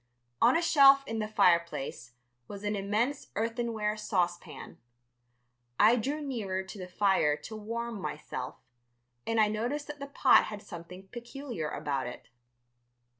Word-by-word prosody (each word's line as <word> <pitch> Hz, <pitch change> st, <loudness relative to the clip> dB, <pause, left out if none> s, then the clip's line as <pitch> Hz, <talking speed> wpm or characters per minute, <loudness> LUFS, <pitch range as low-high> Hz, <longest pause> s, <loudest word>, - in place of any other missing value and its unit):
On -, -, +6 dB
a 340 Hz, -, 0 dB
shelf 275 Hz, -3 st, +7 dB
in 225 Hz, -3 st, -3 dB
the 215 Hz, -, -1 dB
fireplace 170 Hz, -, +1 dB, 0.3 s
was 200 Hz, 0 st, -8 dB
an 205 Hz, 0 st, -1 dB
immense 215 Hz, +8 st, -1 dB
earthenware 225 Hz, -1 st, -1 dB
saucepan. 180 Hz, -5 st, -3 dB, 1.0 s
I 220 Hz, +3 st, +7 dB
drew 275 Hz, +6 st, -1 dB
nearer 210 Hz, -9 st, -3 dB
to 190 Hz, +2 st, -10 dB
the 180 Hz, -, -6 dB
fire 180 Hz, -6 st, +2 dB
to 185 Hz, +9 st, -9 dB
warm 230 Hz, 0 st, -4 dB
myself, 130 Hz, -6 st, -5 dB, 0.7 s
and 225 Hz, 0 st, +1 dB
I 215 Hz, -, +6 dB
noticed 240 Hz, +8 st, -2 dB
that 295 Hz, -1 st, -8 dB
the 280 Hz, -, -6 dB
pot 275 Hz, -2 st, +5 dB
had 210 Hz, -1 st, -7 dB
something 180 Hz, +2 st, -10 dB
peculiar 240 Hz, -, -6 dB
about 135 Hz, -3 st, -2 dB
it. 120 Hz, -, -9 dB
215 Hz, 140 wpm, -30 LUFS, 185-240 Hz, 1.0 s, shelf